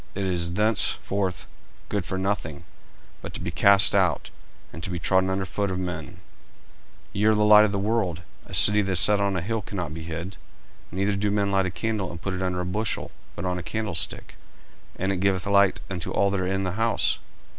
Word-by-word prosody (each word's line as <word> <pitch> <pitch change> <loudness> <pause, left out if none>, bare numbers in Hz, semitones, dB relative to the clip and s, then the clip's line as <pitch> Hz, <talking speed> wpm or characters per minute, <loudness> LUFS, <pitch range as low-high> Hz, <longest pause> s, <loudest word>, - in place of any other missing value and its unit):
it 100 0 -2
is 85 -2 -2
thenceforth 100 -2 0 0.4
good 100 -4 -2
for 95 - -3
nothing, 95 -6 -3 0.6
but - - -8
to - - -5
be - - -4
cast 100 -1 +5
out, - - +1 0.4
and 85 - -8
to - - -4
be 90 - -3
trodden 95 +2 +2
under 95 0 -1
foot 100 +1 -2
of 95 - -3
men. 90 -1 -4
40:005:014 90 - -14 1.0
Ye 100 +2 0
are 110 0 +5
the 105 0 +2
light 105 0 +8
of 105 - -1
the 100 - -1
world. 100 -5 -1 0.2
A - - -4
city 105 0 +7
that 95 -1 -1
is 90 - +4
set 105 +1 +5
on 100 -2 0
an 85 - -3
hill 115 +3 -2
cannot 90 -5 -5
be 80 - -7
hid. 85 +3 -6 0.5
40:005:015 90 - -7
Neither 100 +1 +1
do 105 +1 0
men 100 -1 0
light 95 -1 +2
a - - -1
candle, 95 +1 -3
and 85 - -8
put 95 +2 -4
it 95 - -4
under 90 -1 -1
a - - -3
bushel, 105 +3 -2 0.2
but 90 - -5
on 90 -1 -1
a - - -5
candlestick; 105 -4 -4 0.6
and 95 +1 -1
it 95 - -1
giveth 95 -1 0
light 100 -1 +3
unto 90 -3 -5
all 100 0 +1
that 100 - -1
are 90 - -1
in 95 +1 -1
the 90 - -2
house. 115 +4 +1
95 Hz, 225 wpm, -25 LUFS, 90-100 Hz, 1.0 s, light